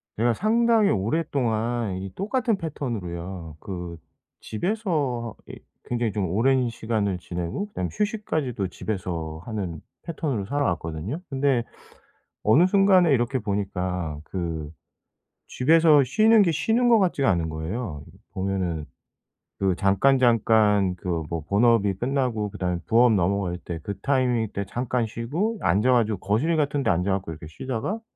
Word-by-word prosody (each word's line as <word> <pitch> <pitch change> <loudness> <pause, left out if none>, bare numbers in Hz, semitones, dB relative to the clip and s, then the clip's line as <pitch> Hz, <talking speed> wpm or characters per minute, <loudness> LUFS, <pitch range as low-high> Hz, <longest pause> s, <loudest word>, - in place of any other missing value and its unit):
제가 120 +2 +2
상당히 225 - +3
오랫동안 115 - 0
이 95 0 -6
똑같은 225 +2 0
패턴으로요. 95 - -5
그 90 -3 -6 0.4
집에서 145 - -2
하 - - -8
이 - - -10 0.3
굉장히 120 -2 0
좀 95 -3 -2
오랜 125 +6 +2
시간을 110 -4 -1
지내고 90 - -4
그다음에 90 - -4
휴식까지도 160 - -2
집에서 85 -5 -4
하는 95 -8 -4 0.2
패턴으로 145 - -3
살아왔거든요. 90 - -2
근데 135 -3 +1 0.8
어느 145 +12 +5
순간에 185 -4 +5
이렇게 125 0 +1
보니까 95 -6 -3
그 85 -5 -4 0.8
집에서 155 +1 +4
쉬는 215 - +5
게 175 -4 +2
쉬는 230 - +2
것 230 - +7
같지가 175 -8 +2
않은 85 -3 0
거예요. 80 - -5 0.3
보면은 95 -5 -2 0.7
그 95 -2 +1
잠깐잠깐 105 -2 +3
그 90 -3 -2
뭐 85 -1 -2
본업이 105 -1 +3
끝나고 120 -3 -1
그다음에 90 -3 -2
부업 120 0 +5
넘어갈 95 -1 0
때 85 -1 -6
그 100 +2 -5
타이밍 125 -3 +1
때 100 - -3
잠깐 120 +1 -1
쉬고 155 - -2
앉아 105 +8 +3
가지고 110 -5 +2
거실 115 - +1
같은 145 -1 0
데 115 - +1
앉아 90 +2 +1
가지고 80 - -7
이렇게 80 -1 -9
쉬다가 130 - -4
110 Hz, 315 characters per minute, -25 LUFS, 95-140 Hz, 0.8 s, 것